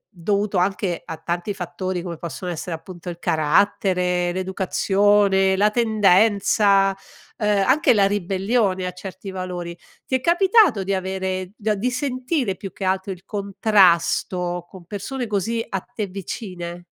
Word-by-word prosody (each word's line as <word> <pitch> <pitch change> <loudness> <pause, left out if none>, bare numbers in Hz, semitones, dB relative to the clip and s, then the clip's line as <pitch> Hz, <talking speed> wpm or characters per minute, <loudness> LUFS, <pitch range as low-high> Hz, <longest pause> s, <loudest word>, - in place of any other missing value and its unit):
dovuto 200 +3 -1
anche 185 -1 0
a 165 -2 -6
tanti 175 +5 -3
fattori 185 -1 -4
come 170 -3 -6
possono 175 +2 -5
essere 170 +1 -4
appunto 175 +2 -9
il 170 - -6
carattere, 180 +2 +1
l'educazione, 190 +1 +2
la 205 +2 +4
tendenza, 205 -2 +3 0.4
ehm, 210 -3 +2
anche 270 -1 +4
la 200 -2 +4
ribellione 195 0 0
a - - -3
certi 190 +1 -8
valori, 180 -2 -5 0.3
ti 260 - -1
è 255 - 0
capitato 370 - +4
di 195 +1 -1
avere, 190 0 -2
do 190 - -24
di 215 - -10
avere 210 -2 +1
di 250 +5 0
sentire 255 - -1
più 195 +1 -7
che 195 - -8
altro, 190 +1 -1
il 185 0 -15
contrasto 185 -3 +2
con 185 -3 -13
persone 220 +7 -5
così 225 +3 -1
a 195 -4 -2
te 225 -4 -5
vicine? 180 -2 -7
195 Hz, 150 wpm, -22 LUFS, 180-210 Hz, 0.4 s, la